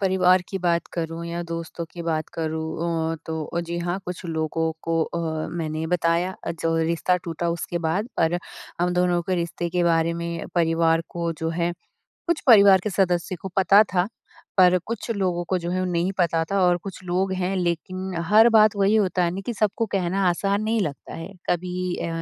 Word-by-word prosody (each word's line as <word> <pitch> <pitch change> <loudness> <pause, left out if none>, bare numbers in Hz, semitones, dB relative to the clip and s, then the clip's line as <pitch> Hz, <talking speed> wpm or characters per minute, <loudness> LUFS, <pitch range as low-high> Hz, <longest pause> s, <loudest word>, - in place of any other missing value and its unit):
परिवार 185 -1 +4
की 195 - -3
बात 170 -2 +1
करूँ 165 0 -4
या 170 +1 -3
दोस्तों 165 0 -5
की 170 - -7
बात 160 -2 -1
करूँ 160 +1 -2
अ, - - -3
तो 160 +1 -3
जी 170 0 -4
हाँ 175 +2 -2
कुछ 180 +1 -6
लोगों 160 0 -1
को 165 0 +1
अ, 160 -1 -3
मैंने 160 -1 -3
बताया 175 +1 +1 0.3
जो 165 0 +1
रिश्ता 170 +2 +1
टूटा 170 0 -2
उसके 170 +1 -3
बाद। 175 +7 -1
पर 165 +2 +2 0.4
हम 175 0 +2
दोनों 180 -1 +2
के 185 +2 -1
रिश्ते 170 0 -2
के 180 0 +1
बारे 165 -1 +2
में 170 0 -4
परिवार 165 -1 +2
को 170 -1 -2
जो 160 - -2
है 170 +1 -1 0.5
कुछ 340 -2 +1
परिवार 200 -6 +8
के 210 - -1
सदस्य 180 -2 0
को 190 - -4
पता 195 +2 +6
था। 180 0 +3 0.5
पर 185 -1 +6
कुछ 230 +1 -4
लोगों 185 -5 0
को 185 - +1
जो 170 0 -4
है 185 +1 0
वो 185 - 0
नहीं 175 +3 0
पता 165 -2 +2
था 200 0 +2
और 180 -1 +4
कुछ 195 -1 -8
लोग 185 +2 0
हैं 185 +1 -1
लेकिन 185 +2 -2
हर 220 +3 +7
बात 215 -2 +5
वही 200 +1 +3
होता 185 -4 +2
है 170 - +1
ना 195 - -4
कि 240 - -1
सबको 215 +2 0
कहना 190 0 +1
आसान 195 +4 0
नहीं 220 +1 +1
लगता 150 -8 -4
है। 165 +4 -7 0.2
कभी 180 +1 -1
अ, - - -3
175 Hz, 195 wpm, -24 LUFS, 165-190 Hz, 0.5 s, परिवार